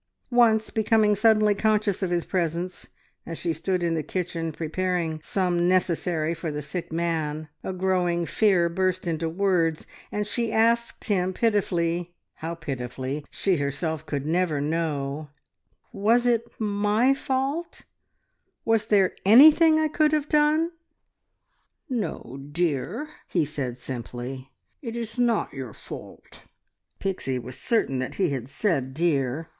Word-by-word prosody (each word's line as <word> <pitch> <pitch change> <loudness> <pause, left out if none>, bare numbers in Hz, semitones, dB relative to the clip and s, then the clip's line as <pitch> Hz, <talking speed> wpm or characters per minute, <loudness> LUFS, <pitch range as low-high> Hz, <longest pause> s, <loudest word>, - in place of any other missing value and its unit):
Once, 225 -3 +4
becoming 220 -1 +3
suddenly 215 0 +4
conscious 210 -1 +1
of 190 - 0
his 175 -1 0
presence, 175 0 -2 0.4
as 165 - -6
she 170 -2 -1
stood 180 +3 -1
in 170 -1 +1
the 160 - 0
kitchen 165 -1 -3
preparing 165 0 -2
some 175 -3 +1
necessary 170 -3 +1
for 165 0 -4
the 150 -1 -3
sick 170 +3 -5
man, 160 -2 -2 0.2
a - - -3
growing 180 -2 0
fear 185 -3 +3
burst 185 +1 -1
into 165 -1 -1
words, 170 -3 +1 0.3
and 210 0 -1
she 230 +2 -1
asked 230 +1 +2
him 185 -3 +1
pitifully 175 -5 0 0.2
how 165 +1 -4
pitifully 135 -1 -4
she 190 -3 0
herself 145 +2 -2
could 145 -2 -3
never 165 -2 +1
know 150 -1 -2 0.6
"Was 225 +5 +3
it 235 -1 +2
my 210 +4 +2
fault? 275 +5 -2 0.8
Was 225 -1 +2
there 195 -4 +3
anything 310 - +8
I 315 - +2
could 305 0 +2
have 300 -1 +1
done?" 305 +2 +3 1.2
"No, 200 - -3
dear," 175 - -1 0.2
he 170 -4 +1
said 140 -5 -4
simply. 125 +1 -6 0.3
"It 230 -5 -5
is 230 +1 -5
not 235 -3 +1
your 130 -5 -6
fault." - - -11 0.6
Pixie 180 -9 -2
was 125 +1 -7
certain 220 - 0
that 130 - -4
he 185 -3 +1
had 130 -2 -4
said 140 -5 -1
"dear." 150 -2 0
175 Hz, 135 wpm, -25 LUFS, 155-215 Hz, 1.2 s, anything